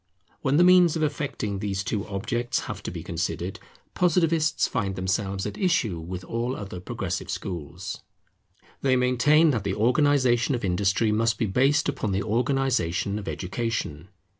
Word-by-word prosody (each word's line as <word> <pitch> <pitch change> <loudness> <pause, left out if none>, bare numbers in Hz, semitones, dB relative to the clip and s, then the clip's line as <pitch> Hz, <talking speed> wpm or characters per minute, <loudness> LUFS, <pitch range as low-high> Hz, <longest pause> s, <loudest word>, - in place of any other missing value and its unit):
When 140 +1 +2
the 175 - +6
means 180 -2 +6
of 160 - 0
effecting 140 -9 -2
these 100 -1 -2
two 100 +2 -2
objects 115 +5 -2
have - - -6
to - - -5
be - - -6
considered, - - -3 0.3
Positivists 165 -3 +2
find 100 -7 -2
themselves 95 +1 -1
at 105 - -5
issue 120 - +1
with 90 +3 -6
all 120 +6 -2
other 95 -3 -7
Progressive 95 -3 -4
schools. 90 -6 -5 0.8
They 130 -1 +3
maintain 130 +6 +4
that 115 -7 -1
the 100 -1 -1
organization 125 +1 +3
of 115 - -3
Industry 100 +4 +1
must 115 +1 +1
be 115 - 0
based 135 +8 +2
upon 130 -8 -1
the 95 - 0
organization 110 -5 0
of 105 - -9
Education. 95 -5 -3
115 Hz, 155 wpm, -26 LUFS, 95-135 Hz, 0.8 s, the